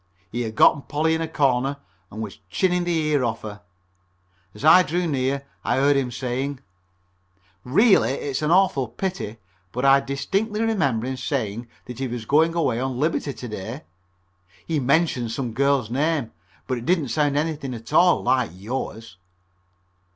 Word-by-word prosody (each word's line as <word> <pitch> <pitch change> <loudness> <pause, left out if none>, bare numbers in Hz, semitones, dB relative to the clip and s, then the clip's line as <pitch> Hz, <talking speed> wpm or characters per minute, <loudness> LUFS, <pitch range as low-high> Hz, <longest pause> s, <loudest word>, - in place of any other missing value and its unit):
He 120 - -2
had 110 -2 -4
gotten 140 - +5
Polly 155 +3 0
in 160 - -1
a 165 - -1
corner 135 -3 +1 0.3
and 110 +2 -6
was 105 - -8
chinning 180 - +1
the 175 -1 0
ear 145 -3 +2
off 115 -2 -2
of 110 - -5
her. 105 0 -13 0.9
As - - -6
I 160 +4 +8
drew 175 +1 -1
near 140 -2 -1 0.2
I - - +1
heard 140 +2 +3
him 135 -2 0
saying: 130 +3 -3 1.0
"Really 165 - +4
it's 140 0 -3
an 150 - 0
awful 175 -8 +3
pity, 120 - -4 0.3
but 125 +6 -2
I 135 0 +7
distinctly 195 +11 -2
remember 150 - +1
him 130 0 -3
saying 120 -3 -3 0.2
that 125 0 -9
he 135 - -1
was 120 -2 -5
going 160 +6 +3
away 150 -8 +1
on 130 -1 -3
liberty 150 -1 0
to 125 - -8
day. 110 +6 -6 0.8
He 160 -2 -1
mentioned 130 -4 +1
some 125 -4 -3
girl's 135 -2 +1
name, 145 -2 0 0.3
but 130 -2 -2
it 120 - -9
didn't 165 -7 +1
sound 145 0 +1
anything 145 -4 -2
at 115 0 -10
all 180 0 +5
like 130 -3 +2
yours." 110 -1 -6
135 Hz, 170 wpm, -23 LUFS, 120-155 Hz, 1.0 s, I